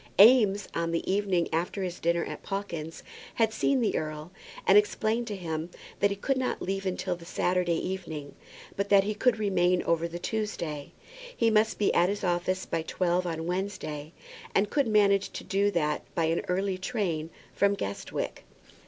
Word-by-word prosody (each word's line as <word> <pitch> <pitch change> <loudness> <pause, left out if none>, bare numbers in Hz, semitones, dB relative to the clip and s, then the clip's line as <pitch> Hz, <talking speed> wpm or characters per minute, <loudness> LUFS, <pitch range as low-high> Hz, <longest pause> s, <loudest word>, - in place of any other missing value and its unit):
Eames, 205 -3 +7
on 170 0 -1
the 165 +2 -1
evening 195 -4 +1
after 175 +4 -1
his 180 -1 -4
dinner 170 0 +1
at - - -7
Pawkins's, 170 -5 -5 0.3
had 225 -1 +2
seen 270 +3 +2
the 220 - +1
earl, 155 +2 -4 0.3
and 195 - +6
explained 220 +3 +2
to 210 - -3
him 165 -3 -4 0.3
that 200 - +4
he 200 - -2
could 265 +7 -1
not 260 -1 -1
leave 195 +1 -3
town 185 -1 -1
till 185 -2 -2
the 170 - -13
Saturday 180 0 0
evening; 160 -7 -5 0.4
but 200 0 -2
that 200 -1 +6
he 210 +2 -1
could 230 +2 +2
remain 180 -4 +2
over 170 0 +1
the 170 0 -6
Tuesday. 170 -8 -3 0.5
He 230 - +3
must 220 0 +3
be 205 - +2
at 175 +1 +4
his 205 0 -3
office 185 +1 0
by 165 - -1
twelve 180 +2 0
on 165 -1 -3
Wednesday, 175 -5 -3 0.4
and 200 +1 +2
could 280 -4 +2
manage 200 -2 +3
to - - -6
do 200 +1 +1
that 150 -6 0
by 165 - +2
an 165 +1 +1
early 185 +1 0
train 185 -7 -2 0.2
from 200 0 +3
Guestwick. 100 - -4
185 Hz, 180 wpm, -28 LUFS, 170-205 Hz, 0.5 s, Eames